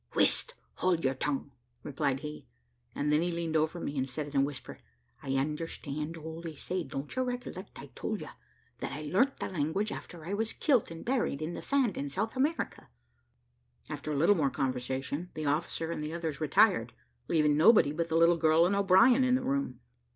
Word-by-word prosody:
"Whist, - - +2 0.2
hold 180 -3 +1
your 130 - +3
tongue," 140 +1 -2 0.3
replied 140 -1 -1
he; 150 - -7 0.5
and 150 +1 0
then 150 - +4
he 175 +1 0
leaned 170 -1 -2
over 160 +2 +1
me, 145 - -4
and 130 +1 -1
said 145 +3 -5
in 135 - +4
a - - +4
whisper, 140 -1 -5 0.4
"I 135 -1 -2
understand 150 +2 -3
all 160 +1 -7
they 165 -2 -6
say; 180 +5 -3
don't 140 0 -6
you 255 - +1
recollect, 245 -6 -5
I - - -10
told - - -3
you - - -7 0.5
that - - -4
I 145 +3 -5
learnt 215 - +2
the - - -2
language 180 +5 -1
after 165 -3 -8
I 190 - -3
was 220 +2 -1
kilt 265 -8 +2
and 165 0 -9
buried 240 - 0
in 155 +2 -3
the - - -6
sand 270 -7 +1
in 140 - -3
South 215 - -2
America?" 290 +6 -1 1.0
After 150 0 -4
a - - -1
little 170 +8 +5
more 150 -8 +1
conversation, 135 +5 -2
the 155 - -3
officer 160 +2 -1
and 160 - -3
the 155 +2 -4
others 160 -3 -4
retired, 155 - +3 0.3
leaving 150 -3 +3
nobody 165 -1 +6
but 170 +2 -2
the 160 - +2
little 170 +1 +5
girl 160 +1 +4
and 190 +3 +2
O'Brien 200 +7 +5
in 255 0 +4
the 255 - -1
room. 270 - -2
160 Hz, 200 wpm, -30 LUFS, 145-195 Hz, 1.0 s, nobody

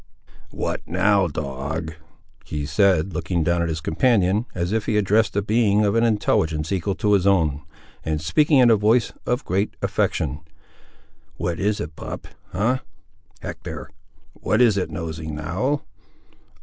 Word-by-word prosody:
"What - - -3
now, 95 +2 +3
dog?" 75 +2 -4 0.5
he 75 -2 -4
said, 95 +2 +2
looking 85 +1 -1
down 85 +2 +1
at 85 - 0
his 80 0 -3
companion, 105 +2 +2
as 90 +1 -1
if 110 -1 -1
he 105 - +2
addressed 105 0 +2
a 100 - +1
being 105 -1 +3
of 100 - +2
an 115 - +3
intelligence 80 -8 +1
equal 95 0 -1
to 105 -1 +1
his 100 -1 +3
own, 80 -7 +2 0.4
and 80 -1 -1
speaking 140 - +3
in 125 -3 +6
a - - +7
voice 110 +3 +2
of 125 +3 0
great 95 +4 -1
affection. 75 - -1 1.0
"What 85 -1 -2
is 105 +1 0
it, 75 +1 -5
pup? - - -7 0.2
ha! 120 +7 0 0.6
Hector; 70 +3 -7 0.4
what 105 +4 0
is 120 -5 +5
it 95 -4 -1
nosing, 80 -1 -5
now? 95 - -1
95 Hz, 150 wpm, -23 LUFS, 80-105 Hz, 1.0 s, a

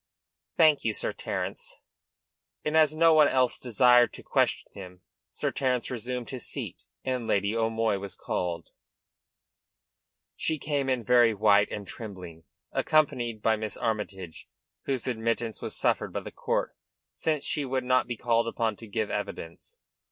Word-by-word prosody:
"Thank 155 -4 +5
you, 110 -2 0
Sir - - -2
Terence." - - -5 0.9
And, 150 - 0
as 155 -1 +5
no 165 0 +5
one 155 -2 +7
else 130 -2 +2
desired 125 0 +4
to - - -10
question - - 0
him, 90 -2 -10 0.3
Sir - - -2
Terence 130 -3 -1
resumed 125 +1 -4
his 130 -3 -5
seat, - - -6 0.2
and 125 -3 -2
Lady 100 +2 +1
O'Moy 115 -2 +1
was 100 -1 -7
called. 85 -2 -3 1.7
She 160 - -1
came 140 -2 -1
in 130 -3 0
very 120 -2 +5
white 105 0 +4
and 100 - -5
trembling, 90 -6 -9 0.3
accompanied 120 -8 +1
by 110 - +4
Miss 110 0 -4
Armytage, 100 -7 -4 0.4
whose 130 -4 -2
admittance 115 -1 -2
was - - -4
suffered - - +1
by - - -2
the - - -8
court, - - -2 0.4
since 155 -3 -1
she 150 - 0
would 130 -1 -1
not 130 0 +2
be 120 - -4
called 115 0 +1
upon 115 -3 -1
to 115 - -11
give 105 0 -2
evidence. 85 -5 -6
115 Hz, 150 wpm, -28 LUFS, 105-130 Hz, 1.7 s, one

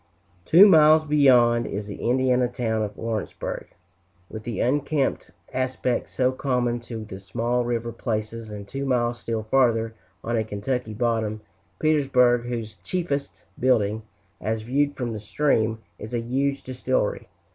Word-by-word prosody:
Two 185 +6 +8
miles 155 -3 +6
beyond, 125 -6 +4
is 105 +1 -4
the 100 - -8
Indiana 125 0 +3
town 115 -2 -2
of 105 -1 -4
Lawrenceburg, 110 -2 -4 0.6
with 110 - -6
the 115 0 -5
unkempt 140 0 0 0.2
aspect 130 -1 -1
so 130 0 +1
common 125 -2 -1
to 115 -2 -7
the 95 -2 -8
small 120 +5 -1
river 120 -1 -2
places; 110 -1 -4
and 105 -1 -8
two 135 +5 -4
miles 120 -3 0
still 115 -1 -3
farther, 115 -1 +2 0.3
on 120 - -1
a 110 - +1
Kentucky 110 +2 -3
bottom, 110 -2 -1 0.4
Petersburg, 130 -6 +3
whose 115 -3 -5
chiefest 145 - -3
building, 110 -4 +2 0.4
as 110 +2 -2
viewed 145 +5 0
from 120 -3 -3
the 110 - -5
stream, 115 -2 +1 0.2
is 110 +3 -6
a - - +1
huge 135 +4 -1
distillery. - - -1
120 Hz, 145 wpm, -24 LUFS, 110-135 Hz, 0.6 s, Two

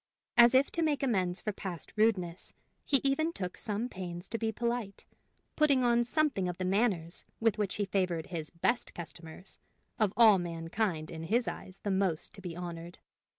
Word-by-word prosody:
As 240 +1 +7
if 270 +2 +4
to 335 - -1
make 300 -3 +1
amends 190 -8 +1
for 215 - -1
past 185 -4 -6
rudeness, 190 -6 0 0.3
he 275 -3 +3
even 275 +4 +2
took 180 - -5
some 220 +1 -2
pains 180 -4 -7
to 230 - -3
be 225 -1 0
polite, 235 -2 -3 0.5
putting 280 -4 +4
on 240 0 +4
something 260 - +1
of 175 - -5
the 185 - -2
manners 185 -4 0 0.2
with 225 -2 +2
which 205 -3 -1
he 205 - 0
favored 185 -4 0
his 160 -2 -3
"best 205 +8 -1
customers," 165 +1 -8 0.4
of 215 -3 +3
all 220 -5 +8
mankind 165 0 -2
in 160 0 -6
his 235 +7 +1
eyes 185 - -7
the 205 - -1
most 190 -4 0
to 195 - -11
be 175 -3 -6
honored. 175 -1 -7
195 Hz, 180 wpm, -31 LUFS, 175-235 Hz, 0.5 s, all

